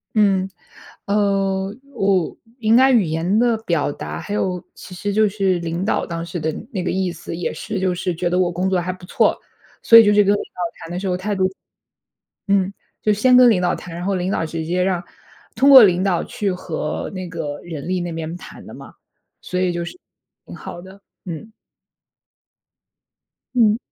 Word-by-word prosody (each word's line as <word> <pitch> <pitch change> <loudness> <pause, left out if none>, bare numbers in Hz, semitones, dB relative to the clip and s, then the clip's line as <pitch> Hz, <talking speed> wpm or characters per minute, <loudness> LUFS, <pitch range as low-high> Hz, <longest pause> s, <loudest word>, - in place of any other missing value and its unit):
嗯， 195 -3 +3 0.6
呃， 195 -1 0 0.2
我 195 -6 +1 0.2
应 220 -1 +2
该 260 +3 +6
语 235 -6 +4
言 165 +5 0
的 235 -1 +3
表 170 -9 -1
达， - - -6
还 205 - -5
有 180 -3 -2
其 - - -12
实 205 +3 -3
就 215 0 +4
是 190 -3 0
领 170 +2 -3
导 210 - 0
当 165 -1 -5
时 170 0 -5
的 160 +1 -1 0.2
那 190 -5 -2
个 180 - -1
意 185 -1 -1
思， 165 0 -7
也 175 - -2
是 215 -2 -4
就 185 -1 0
是 180 +1 -2
觉 175 +1 -1
得 175 - 0
我 180 -1 +2
工 180 +2 -1
作 185 -1 +1
还 180 +1 -3
不 180 -1 -12
错， - - +2 0.4
所 230 - +7
以 225 - +9
就 205 - +4
是 205 0 +5
跟 200 +1 +3
领 205 - -2
导 - - -12 0.2
谈 165 - -9
的 175 - -3
时 195 - -4
候 180 - 0
态 205 +3 -2
度 185 -1 +2 1.0
嗯， 195 -1 +2 0.3
就 215 - +3
先 250 +5 +5
跟 250 0 +8
领 195 -6 +2
导 180 - +1
谈， 175 - -9
然 175 - -5
后 195 0 0
领 185 +1 -1
导 - - 0
直 160 0 -4
接 180 +2 0
让 185 -1 0 0.5
通 275 - +4
过 265 -3 +11
领 185 -2 +3
导 185 -3 +1
去 200 -2 -2
和 165 -4 -4
那 185 -2 -6
个 155 -4 -5
人 160 -4 -7
力 185 0 0
那 175 0 -4
边 165 0 -5
谈 175 - -12
的 - - -11
嘛， - - -12 0.5
所 180 - -3
以 185 -1 +1
就 170 0 -3
是 360 - -10 0.5
挺 - - -9
好 175 - -8
的， 190 +2 -13 0.3
嗯。 180 +5 -7 2.0
嗯。 225 -3 +4
185 Hz, 220 characters per minute, -20 LUFS, 175-205 Hz, 2.0 s, 过